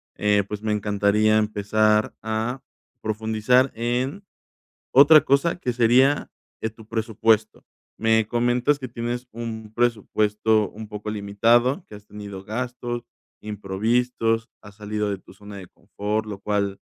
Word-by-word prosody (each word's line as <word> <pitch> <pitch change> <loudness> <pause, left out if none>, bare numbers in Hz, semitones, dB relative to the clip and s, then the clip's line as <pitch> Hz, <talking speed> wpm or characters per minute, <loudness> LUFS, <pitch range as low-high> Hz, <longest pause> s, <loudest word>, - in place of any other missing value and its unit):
eh, 105 -1 +2
pues, 105 0 -5
me 110 -1 -1
encantaría 105 +1 +2
empezar 105 0 +1
a 110 +4 -2 0.4
profundizar 110 +4 +1
en 125 - -2 0.7
otra 145 +3 +8
cosa 140 +6 +2
que 125 -8 -2
sería 125 +4 +3 0.3
eh, 110 - -1
tu 110 0 -16
presupuesto. 110 -1 +1 0.4
Me 110 -1 +2
comentas 120 +4 +1
que 130 - -6
tienes 120 +1 -4
un 110 -1 -6
presupuesto 110 -2 +1
un 110 +1 -9
poco 105 0 -7
limitado, 115 - +2
que - - -12
has 105 0 -13
tenido 100 -2 -9
gastos 120 +2 -4 0.4
imprevistos, 115 +3 -1
has 105 -1 -14
salido 105 0 -3
de 100 - -2
tu - - -17
zona 100 +1 -11
de 95 - -9
confort, 105 +4 -4
lo 105 -2 -6
cual 100 -1 -1
110 Hz, 135 wpm, -23 LUFS, 105-120 Hz, 0.7 s, otra